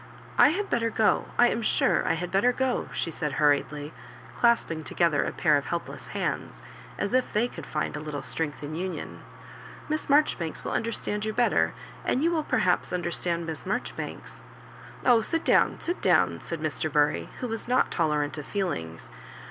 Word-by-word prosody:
"I -, -, +7 dB
had 400 Hz, +6 st, -1 dB
better 230 Hz, -1 st, +1 dB
go 220 Hz, -1 st, +2 dB
— -, -, -18 dB
I -, -, +4 dB
am 235 Hz, -, -1 dB
sure 215 Hz, -, +2 dB
I 165 Hz, -, +2 dB
Iiad 175 Hz, +2 st, -4 dB
better 200 Hz, +6 st, +4 dB
go," 260 Hz, 0 st, -1 dB
she 165 Hz, -, -2 dB
said, 150 Hz, -3 st, -3 dB
hurriedly, 145 Hz, +1 st, +1 dB, 0.4 s
clasping 230 Hz, -9 st, +2 dB
together 165 Hz, -3 st, +1 dB
a -, -, -2 dB
pair 150 Hz, -3 st, +3 dB
of 140 Hz, -, -4 dB
helpless 170 Hz, 0 st, -4 dB
hands, -, -, -3 dB, 0.3 s
as 200 Hz, -, -2 dB
if 255 Hz, 0 st, +2 dB
they 220 Hz, +3 st, +2 dB
could 165 Hz, -, -9 dB
find 150 Hz, -1 st, -2 dB
a -, -, -3 dB
little 150 Hz, -2 st, -5 dB
strength 150 Hz, +4 st, -3 dB
in 145 Hz, +1 st, -5 dB
union. 185 Hz, +3 st, -5 dB, 0.4 s
" -, -, -15 dB
Miss 310 Hz, -1 st, -2 dB
Marjoribanks 275 Hz, -, +2 dB
will -, -, -2 dB
understand 210 Hz, -2 st, -2 dB
you 215 Hz, 0 st, -2 dB
better, 240 Hz, +1 st, +2 dB, 0.3 s
and 265 Hz, -, +1 dB
you 335 Hz, -, +3 dB
will, 320 Hz, -2 st, 0 dB
perhaps 180 Hz, -10 st, +1 dB
understand 175 Hz, -1 st, -1 dB
Miss 160 Hz, -1 st, -5 dB
Marjoribanks -, -, -5 dB, 0.2 s
" -, -, -18 dB
" -, -, -16 dB
Oh, 240 Hz, -2 st, +6 dB
sit 325 Hz, +9 st, -2 dB
down, -, -, +3 dB
sit 350 Hz, +2 st, -3 dB
down," -, -, +3 dB
said 170 Hz, -2 st, -5 dB
Mr. 155 Hz, 0 st, -2 dB
Bury, 150 Hz, 0 st, +2 dB
who 250 Hz, -, -2 dB
was 225 Hz, 0 st, -5 dB
not 250 Hz, +1 st, +2 dB
tolerant 150 Hz, -3 st, 0 dB
of 145 Hz, -, -8 dB
feelings. 85 Hz, -, -3 dB
175 Hz, 190 wpm, -27 LUFS, 150-235 Hz, 0.4 s, I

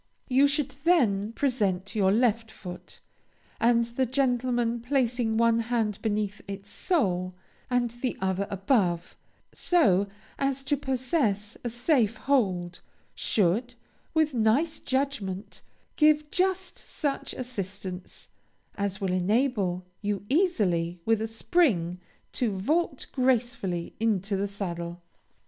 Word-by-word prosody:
You 265 Hz, +2 st, +5 dB
should 280 Hz, -1 st, 0 dB
then 225 Hz, -, +3 dB
present 205 Hz, -9 st, 0 dB
your 195 Hz, -3 st, +3 dB
left 230 Hz, 0 st, +2 dB
foot, 180 Hz, -2 st, -10 dB, 0.6 s
and 235 Hz, 0 st, +4 dB
the 240 Hz, +2 st, -1 dB
gentleman 245 Hz, -2 st, +1 dB
placing 240 Hz, -3 st, 0 dB
one 230 Hz, 0 st, +4 dB
hand 225 Hz, -3 st, -1 dB
beneath 210 Hz, -2 st, -1 dB
its 195 Hz, 0 st, -7 dB
sole, 185 Hz, -, 0 dB, 0.3 s
and 245 Hz, -2 st, +1 dB
the 240 Hz, +1 st, -3 dB
other 190 Hz, +1 st, 0 dB
above, 195 Hz, -4 st, +1 dB, 0.4 s
so 200 Hz, -, +3 dB, 0.3 s
as 275 Hz, -1 st, 0 dB
to 290 Hz, -, +1 dB
possess 255 Hz, -, -1 dB
a 240 Hz, -, -1 dB
safe 240 Hz, -2 st, +1 dB
hold, 185 Hz, -11 st, 0 dB, 0.3 s
should, 220 Hz, +6 st, +1 dB, 0.4 s
with 310 Hz, -2 st, +3 dB
nice 250 Hz, +8 st, +2 dB
judgment, 260 Hz, -8 st, -2 dB, 0.4 s
give 300 Hz, -1 st, +4 dB
just 375 Hz, 0 st, 0 dB
such 285 Hz, -3 st, -3 dB
assistance 195 Hz, -6 st, -6 dB, 0.4 s
as 200 Hz, -1 st, -2 dB
will 190 Hz, -3 st, -1 dB
enable 190 Hz, -2 st, +1 dB, 0.2 s
you 205 Hz, -1 st, -2 dB
easily, 190 Hz, -, +1 dB
with 225 Hz, -1 st, +2 dB
a 220 Hz, -, -1 dB
spring, 220 Hz, -, +1 dB, 0.3 s
to 220 Hz, -6 st, -1 dB
vault 295 Hz, -, 0 dB
gracefully 240 Hz, -9 st, 0 dB
into 210 Hz, -3 st, +1 dB
the 200 Hz, +1 st, 0 dB
saddle. 175 Hz, -4 st, -5 dB
225 Hz, 115 wpm, -27 LUFS, 195-260 Hz, 0.6 s, You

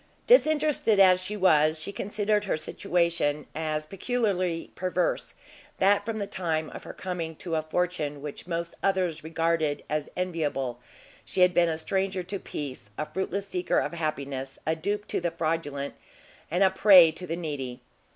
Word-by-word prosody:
Disinterested 310 Hz, -, +4 dB
as 185 Hz, -2 st, +6 dB
she 210 Hz, +3 st, -4 dB
was, 155 Hz, -4 st, +4 dB
she 160 Hz, -, -4 dB
considered 210 Hz, +1 st, 0 dB
her 195 Hz, -, 0 dB
situation 165 Hz, -2 st, 0 dB
as 155 Hz, -1 st, -2 dB
peculiarly 190 Hz, -3 st, -1 dB
perverse, 180 Hz, -1 st, -1 dB, 0.4 s
that 205 Hz, +1 st, +3 dB
from 225 Hz, -1 st, -2 dB
the 205 Hz, -, -2 dB
time 165 Hz, -6 st, -2 dB
of -, -, -9 dB
her -, -, -7 dB
coming 170 Hz, -3 st, -4 dB
to 170 Hz, +1 st, -6 dB
a 160 Hz, -, +2 dB
fortune 155 Hz, -2 st, -2 dB
which 145 Hz, +3 st, -8 dB
most 170 Hz, -1 st, -3 dB
others 180 Hz, -5 st, 0 dB
regarded 160 Hz, -2 st, 0 dB
as 150 Hz, -1 st, -1 dB
enviable, 150 Hz, -9 st, -2 dB, 0.4 s
she 185 Hz, -, -2 dB
had 180 Hz, 0 st, +6 dB
been 170 Hz, -1 st, +4 dB
a 160 Hz, -, -1 dB
stranger 190 Hz, +2 st, -1 dB
to 195 Hz, +2 st, -4 dB
peace, 135 Hz, -, -6 dB
a 155 Hz, -, -1 dB
fruitless 190 Hz, +3 st, -3 dB
seeker 180 Hz, -2 st, 0 dB
of -, -, 0 dB
happiness, 140 Hz, -5 st, -3 dB
a 160 Hz, +2 st, +1 dB
dupe 205 Hz, +6 st, -2 dB
to -, -, -2 dB
the 170 Hz, -, 0 dB
fraudulent, 160 Hz, -4 st, -2 dB, 0.6 s
and 180 Hz, +4 st, +2 dB
a 190 Hz, -, +5 dB
prey 190 Hz, -4 st, +8 dB
to 180 Hz, +3 st, -9 dB
the 165 Hz, -, -2 dB
needy! 135 Hz, -7 st, -4 dB
170 Hz, 165 wpm, -27 LUFS, 155-190 Hz, 0.6 s, prey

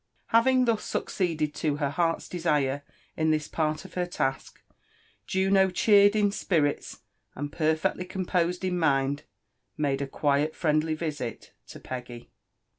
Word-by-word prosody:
Having 255 Hz, +2 st, +4 dB
thus 230 Hz, -3 st, -1 dB
sticcfseded 155 Hz, -5 st, -1 dB
to 150 Hz, -2 st, -1 dB
her 145 Hz, -2 st, -1 dB
heart's 165 Hz, +2 st, 0 dB
desire 150 Hz, -5 st, 0 dB, 0.3 s
in 160 Hz, 0 st, +1 dB
this 155 Hz, -1 st, +1 dB
ptiti 155 Hz, +2 st, -2 dB
of -, -, -12 dB
her 180 Hz, -1 st, -1 dB
task, 135 Hz, -6 st, -3 dB, 0.7 s
Juno, 190 Hz, 0 st, +3 dB
cheered 205 Hz, +2 st, +5 dB
in 205 Hz, -1 st, +3 dB
spirits 155 Hz, -8 st, -1 dB, 0.3 s
and 145 Hz, +1 st, -4 dB
perfectly 160 Hz, +3 st, 0 dB
composed 180 Hz, -1 st, -1 dB
in 180 Hz, -1 st, 0 dB
mind, 140 Hz, -2 st, +1 dB, 0.5 s
made 140 Hz, -3 st, 0 dB
d 140 Hz, -, -2 dB
quiet 145 Hz, +2 st, 0 dB
friendly 155 Hz, 0 st, +1 dB
visit 150 Hz, -7 st, -5 dB, 0.2 s
lo -, -, -9 dB
Peggy. 125 Hz, -2 st, -8 dB
160 Hz, 135 wpm, -27 LUFS, 145-185 Hz, 0.7 s, cheered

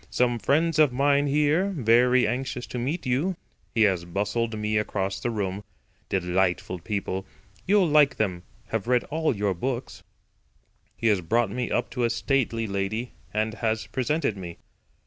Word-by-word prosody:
"Some 120 Hz, -1 st, +1 dB
friends 155 Hz, +7 st, +2 dB
of 150 Hz, -4 st, +6 dB
mine 140 Hz, +2 st, +2 dB
here, 150 Hz, +7 st, +2 dB
very 125 Hz, +1 st, +4 dB
anxious 125 Hz, 0 st, -2 dB
to 125 Hz, -, -5 dB
meet 145 Hz, +8 st, -2 dB
you." 140 Hz, +9 st, 0 dB, 0.4 s
He 115 Hz, -, +5 dB
has 95 Hz, -5 st, +2 dB
bustled 105 Hz, +5 st, -2 dB
me 105 Hz, 0 st, 0 dB
across 95 Hz, -2 st, -2 dB
the 120 Hz, -, -2 dB
room. 100 Hz, -3 st, -3 dB, 0.5 s
"Delightful 90 Hz, 0 st, 0 dB
people. 95 Hz, 0 st, -3 dB, 0.4 s
You'll 195 Hz, -2 st, +4 dB
like 150 Hz, -2 st, +5 dB
them—have 95 Hz, -, -4 dB
read 125 Hz, -1 st, +3 dB
all 160 Hz, -4 st, +1 dB
your 100 Hz, -1 st, 0 dB
books." 125 Hz, +7 st, -4 dB, 1.0 s
He -, -, -5 dB
has 105 Hz, -4 st, +3 dB
brought 115 Hz, +5 st, +1 dB
me 125 Hz, +2 st, -2 dB
up 120 Hz, -, -1 dB
to 125 Hz, -, -2 dB
a 120 Hz, -, +3 dB
stately 115 Hz, -2 st, 0 dB
lady, 105 Hz, +4 st, -2 dB, 0.2 s
and 110 Hz, +1 st, -1 dB
has 110 Hz, -1 st, -1 dB
presented 135 Hz, -2 st, -1 dB
me. 85 Hz, -3 st, -7 dB
115 Hz, 155 wpm, -26 LUFS, 100-135 Hz, 1.0 s, of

